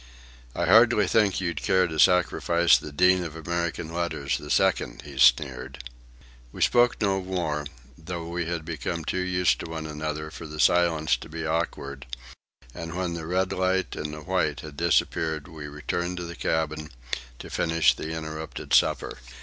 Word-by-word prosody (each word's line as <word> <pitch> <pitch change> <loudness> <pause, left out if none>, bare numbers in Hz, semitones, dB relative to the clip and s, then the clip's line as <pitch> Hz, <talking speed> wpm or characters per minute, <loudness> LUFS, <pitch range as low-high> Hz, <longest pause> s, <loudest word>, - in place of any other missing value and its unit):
"I 85 - 0
hardly 110 +3 +6
think 100 -1 +2
you'll 90 -3 -1
care 95 +3 +2
to 80 -3 -4
sacrifice 85 -1 +4
the 75 - -3
Dean 90 +4 +4
of 80 -2 -6
American 85 0 -3
Letters 85 -5 -1
the - - -9
Second," - - +1
he 70 -3 -9
sneered. 65 +1 +3 0.7
We - - -1
spoke 120 0 +4
no 95 -2 +1
more, 85 -6 -2 0.3
though 85 +2 -6
we 85 0 -3
had 85 -2 -3
become 85 0 -4
too 95 - -1
used 90 -1 +1
to - - -6
one 80 -1 -5
another 75 0 -4
for 80 - -8
the 75 0 -8
silence 85 -3 +3
to - - -11
be 80 +1 -5
awkward; 70 -4 -3 0.7
and 85 0 -6
when 90 -2 -2
the 80 -2 -5
red 95 +2 0
light 95 0 0
and 75 0 -4
the 75 0 -8
white 75 -5 -1
had 75 -2 -9
disappeared 80 -1 0
we 80 -2 -8
returned 85 +5 -3
to 90 - -4
the 85 0 -7
cabin 80 -2 -2 0.5
to - - -10
finish 80 -1 +3
the 80 - -6
interrupted 80 -1 -5
supper. - - +2
80 Hz, 170 wpm, -26 LUFS, 75-90 Hz, 0.7 s, hardly